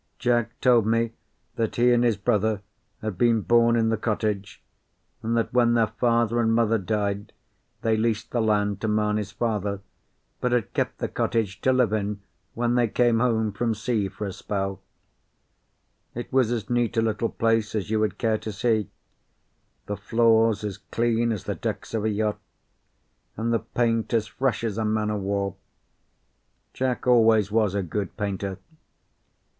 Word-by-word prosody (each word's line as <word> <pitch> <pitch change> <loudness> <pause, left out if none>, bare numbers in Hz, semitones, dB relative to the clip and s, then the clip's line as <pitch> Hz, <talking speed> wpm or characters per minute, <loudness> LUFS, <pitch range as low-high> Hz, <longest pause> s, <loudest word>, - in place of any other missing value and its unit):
Jack 120 -2 0
told 120 -4 +4
me 115 0 +1 0.5
that 115 -2 -1
he 120 +1 +4
and 120 0 +3
his 115 -3 +2
brother 105 -1 0 0.4
had 110 -5 -4
been 115 -2 +3
born 115 +1 +4
in 115 -1 +2
the 115 - +1
cottage, 105 -2 -2 0.6
and 115 +1 0
that 115 - -1
when 120 -1 +4
their 115 -1 +4
father 120 0 +1
and 115 -1 +2
mother 115 -1 +2
died 100 0 -2 0.5
they 115 -1 +2
leased 110 -1 -1
the 120 - +1
land 105 -2 +1
to 110 - -1
Mamie's 105 -1 0
father, 105 -4 -2 0.6
but 125 -1 0
had 120 -4 0
kept - - -1
the - - -2
cottage 105 -5 -1
to 130 - +3
live 125 -4 +2
in 105 -1 -1 0.4
when 120 +1 +1
they 120 -1 +3
came 120 +1 +2
home 110 -3 +1
from 110 +2 -1
sea 110 -2 -1
for 105 - -6
a 95 - -4
spell. 95 0 -3 1.3
It 120 +2 -6
was 130 -3 +3
as 115 -3 -2
neat 120 -1 0
a - - +4
little 110 +1 0
place 115 -1 0
as 105 0 -2
you 110 - +2
would 105 -3 0
care 110 -2 +1
to 110 0 -5
see: 110 0 0 1.0
the 105 - -3
floors 115 +1 +3
as 105 -1 -4
clean 115 +2 0
as 105 -5 -3
the - - -2
decks - - -5
of 110 -2 -1
a - - +2
yacht, 105 0 -1 1.0
and 115 +2 0
the 115 - +2
paint 115 -1 0
as 110 -2 +2
fresh 120 +3 -1
as 110 -1 -2
a - - 0
man 105 0 0
o' 105 - -1
war. 100 -1 -2 1.2
Jack 130 -1 -2
always 110 -4 +4
was 105 -3 +2
a 100 - 0
good 100 +3 -4
painter. 100 -2 -3
110 Hz, 170 wpm, -25 LUFS, 105-115 Hz, 1.3 s, told